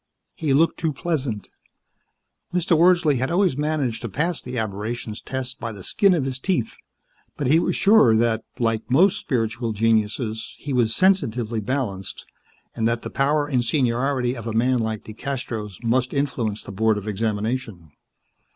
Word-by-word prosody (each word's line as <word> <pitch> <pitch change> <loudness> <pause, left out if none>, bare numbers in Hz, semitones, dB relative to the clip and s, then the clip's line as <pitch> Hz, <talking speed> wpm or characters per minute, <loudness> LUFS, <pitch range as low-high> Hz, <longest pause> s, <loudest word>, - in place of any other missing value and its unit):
He 155 -3 -2
looked 160 +5 +3
too 160 -2 0
pleasant. 135 - -3 1.0
Mr. 180 -1 +2
Wordsley 170 -4 +4
had 130 - 0
always 180 -3 +2
managed 145 -5 -1
to 115 - -4
pass 165 - -1
the 125 0 -6
Aberrations 110 +1 -4
Test 130 0 -4
by 115 0 -4
the 100 -4 -10
skin 195 - +3
of 145 -6 0
his 130 -1 -3
teeth, 150 - -1 0.6
but 145 - -2
he 150 +6 +5
was - - 0
sure 195 - +5
that, 115 -1 +1
like 115 -2 -1
most 175 +10 +4
spiritual 115 -2 -1
geniuses, 110 +1 0
he 140 - -5
was 115 -3 +2
sensitively 120 - +2
balanced, 105 -6 -3 0.5
and 115 -1 +1
that 115 0 -1
the - - -6
power 145 +2 +1
and 130 -4 0
seniority 125 0 +1
of 115 -2 -7
a 115 - -2
man 125 +3 +2
like 110 -2 -2
DeCastros 110 -3 -5
must 125 +3 +1
influence 125 -7 -1
the - - -8
Board 110 +2 +2
of 105 +1 -6
Examination. 105 - -3
125 Hz, 160 wpm, -23 LUFS, 110-140 Hz, 1.0 s, he